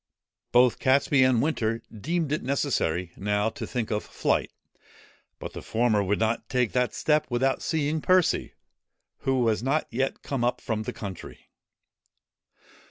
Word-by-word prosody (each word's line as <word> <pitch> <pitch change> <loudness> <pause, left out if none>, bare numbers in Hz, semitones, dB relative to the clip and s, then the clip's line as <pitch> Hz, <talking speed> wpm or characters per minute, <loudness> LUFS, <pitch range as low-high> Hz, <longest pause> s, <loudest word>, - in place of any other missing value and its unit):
Both 125 0 +4
Catesby 135 0 +3
and 130 -3 +3
Winter 115 -7 -1
deemed 160 - -2
it 150 - 0
necessary 105 - -1
now 105 +2 0
to 110 - -7
think 120 -4 -3
of 105 -1 -1
flight; - - -1 0.9
but - - -7
the - - -7
former 110 -2 +1
would 100 +1 0
not 110 +1 -1
take 125 -4 +1
that 125 -3 0
step 150 -1 +1
without 130 +2 +1
seeing 155 0 -1
Percy, 185 0 +2 0.6
who 135 -2 +1
was 110 -2 +1
not 140 +5 +1
yet 135 +3 -2
come 135 -4 -2
up 120 +1 +1
from 110 -2 -2
the 110 - -5
country. 95 -4 -9
125 Hz, 150 wpm, -26 LUFS, 110-140 Hz, 0.9 s, Both